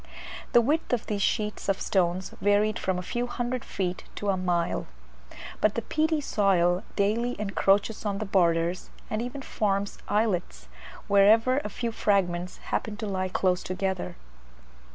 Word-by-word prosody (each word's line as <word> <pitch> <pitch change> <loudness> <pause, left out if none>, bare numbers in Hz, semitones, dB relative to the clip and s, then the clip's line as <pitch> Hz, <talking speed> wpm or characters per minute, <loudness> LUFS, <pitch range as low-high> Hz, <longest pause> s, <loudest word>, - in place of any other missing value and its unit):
The 240 - +7
width 295 +4 0
of 240 - 0
these 205 -2 -2
sheets 210 0 -1
of 195 - +1
stones 185 -1 0
varied 205 +1 +2
from 185 -1 -1
a 180 - -4
few 240 +6 -2
hundred 245 0 -3
feet 180 -2 -3
to 205 - -2
a 195 - +3
mile; 175 -2 -1 0.7
but 215 - +2
the 230 - -2
peaty 315 0 +1
soil 185 -8 +2
daily 225 +4 0
encroaches 200 +1 +1
on 205 -2 -1
the 215 - -3
borders, 175 -2 +1 0.2
and 215 +1 -1
even 250 +3 -5
forms 200 -4 -1
islets 180 - -1 0.4
wherever 220 +6 +5
a 210 - -5
few 230 +3 -3
fragments 180 -5 0 0.2
happen 210 -1 -1
to 225 - -4
lie 185 -2 -2
close 185 0 +1
together. 190 0 -3
200 Hz, 155 wpm, -27 LUFS, 185-225 Hz, 0.7 s, The